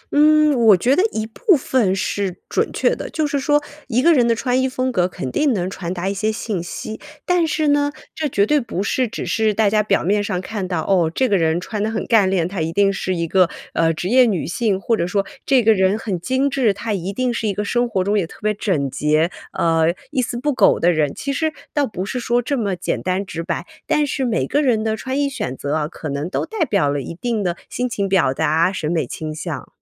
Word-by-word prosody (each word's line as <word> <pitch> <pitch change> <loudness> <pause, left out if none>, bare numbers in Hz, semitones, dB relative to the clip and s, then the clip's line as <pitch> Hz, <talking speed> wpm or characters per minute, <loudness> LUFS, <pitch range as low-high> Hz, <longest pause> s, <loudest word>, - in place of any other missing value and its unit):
嗯， 305 0 +5
我 220 -5 +6
觉 255 +9 +2
得 - - +3
一 220 - -2
部 355 - +2
分 225 -8 +1
是 195 -1 -2
准 - - 0
确 - - +1
的， - - -6
就 310 - -1
是 285 -1 -1
说 295 +1 +2 0.2
一 245 -1 +1
个 340 0 +6
人 245 -4 +3
的 230 - +3
穿 250 +2 0
衣 260 - +1
风 255 0 -1
格 180 -5 +2
肯 130 -7 -6
定 295 - +2
能 180 -4 -1
传 185 -2 -5
达 185 +1 -3
一 195 - 0
些 215 +2 0
信 215 -4 -3
息。 215 +5 -6 0.3
但 355 -2 +2
是 310 -1 0
呢， 290 0 +2 0.2
这 310 -2 -2
绝 200 -5 +2
对 295 +5 +3
不 195 -5 -3
是 250 +4 0
只 - - -5
是 215 -1 +1
大 215 -2 +3
家 215 0 +3
表 210 - +1
面 205 +3 +1
上 185 -3 -2
看 195 0 -4
到， 175 -3 -1
哦， 175 -4 +2
这 260 +6 +1
个 205 - +2
人 165 -1 +2
穿 210 +3 -4
得 215 - 0
很 220 - -3
干 215 -5 +4
练， 180 -3 +1
她 185 -2 -4
一 160 - -1
定 200 +2 +2
是 185 -1 -2
一 170 -1 -2
个， 185 0 +3 0.2
呃， 165 0 +2
职 170 +3 -4
业 250 +2 +5
女 190 -7 -1
性， 200 +2 0
或 230 +3 +1
者 175 -5 -1
说 200 +2 0 0.2
这 265 -3 +4
个 225 0 +6
人 190 +1 +2
很 200 -5 -3
精 260 +9 0
致， 260 -7 +1
她 225 +1 -3
一 190 -1 -3
定 250 +4 -1
是 225 -1 -2
一 205 - 0
个 210 - -2
生 240 +3 0
活 190 -5 0
中 205 +2 +1
也 170 - -2
特 - - -14
别 215 0 +2
整 165 - -1
洁， 155 +3 +1 0.3
呃， 165 +1 +2 0.2
一 260 - +1
丝 240 0 -3
不 290 +4 0
苟 - - +4
的 175 - +4
人。 155 -4 0
其 275 - -3
实 315 +3 0 0.2
倒 290 -2 +1
不 190 -3 -5
是 250 +5 -3
说 240 0 +1
这 265 +4 -1
么 205 -7 -1
简 175 - -3
单 185 +2 -1
直 165 -3 -5
白， 170 0 -3 0.2
但 300 - +2
是 270 -1 -2
每 235 -3 0
个 290 - +1
人 240 -6 +2
的 220 0 0
穿 260 +5 -3
衣 285 - +2
选 135 - -4
择 140 +1 -3
啊， 155 -1 0
可 160 0 -8
能 140 +4 -3
都 - - -2
代 435 -7 -1
表 200 - +1
了 145 0 -2
一 150 - -7
定 230 +3 -2
的 175 -2 -1
心 250 0 -2
情 200 -4 -1
表 190 -8 +3
达、 160 +6 +2
审 160 -5 -3
美 165 -2 0
倾 155 -1 -5
向。 155 - -5
210 Hz, 280 characters per minute, -20 LUFS, 180-255 Hz, 0.3 s, 我